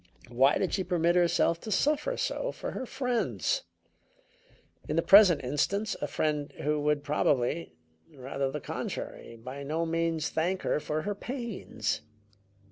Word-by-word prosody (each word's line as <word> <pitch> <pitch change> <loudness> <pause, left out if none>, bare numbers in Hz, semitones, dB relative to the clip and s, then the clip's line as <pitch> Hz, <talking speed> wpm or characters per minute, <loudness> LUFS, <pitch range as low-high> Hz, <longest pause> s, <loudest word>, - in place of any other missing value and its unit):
Why 135 +4 +4
did 185 - -1
she 190 - +1
permit 175 -1 +2
herself 170 -1 +3
to 215 - -6
suffer 300 - +1
so - - -1
for - - -6
her 260 - -5
friends; 260 - -1 1.2
in - - 0
the - - +2
present 195 -8 +7
instance, 195 - 0
a - - -1
friend 150 -2 -1
who 150 0 +1
would 150 -1 +1
probably 145 - 0 0.4
rather 135 -1 -3
the 150 +2 -5
contrary 115 - -5
by 130 +5 -8
no 155 +4 -1
means 165 -1 0
thank 180 +4 -1
her - - +1
for 155 +1 -2
her 205 - -1
pains? 230 - -4
165 Hz, 145 wpm, -29 LUFS, 145-200 Hz, 1.2 s, present